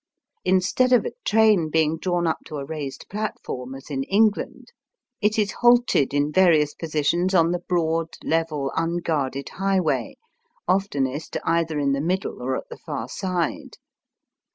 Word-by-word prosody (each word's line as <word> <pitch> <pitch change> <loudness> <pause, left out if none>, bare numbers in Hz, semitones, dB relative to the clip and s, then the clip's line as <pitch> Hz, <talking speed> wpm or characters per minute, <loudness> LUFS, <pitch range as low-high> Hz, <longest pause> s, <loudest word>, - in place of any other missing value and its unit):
Instead 190 +7 +2
of 245 - +4
a - - -2
train 210 -7 +4
being 160 0 +2
drawn 175 +1 -1
up 160 - 0
to 150 - -7
a 140 - -5
raised 145 -2 -6
platform 135 -11 -5
as 135 +2 -11
in 135 -1 -1
England, 210 - +1 0.5
it 210 +1 +2
is 205 -3 +1
halted 240 - +3
in 145 +1 +1
various 155 -4 +4
positions 165 +4 0
on 165 -1 +4
the 175 - -1
broad 165 -2 0
level 155 -4 -1
unguarded 165 -5 -1
highway, 185 -10 0 0.5
oftenest 155 -7 -1
either 165 -2 0
in 140 -1 +1
the 140 0 0
middle 180 -4 -2
or 130 +1 -1
at - - -8
the - - -8
far - - -5
side. 180 -4 -3
165 Hz, 150 wpm, -24 LUFS, 145-190 Hz, 0.5 s, of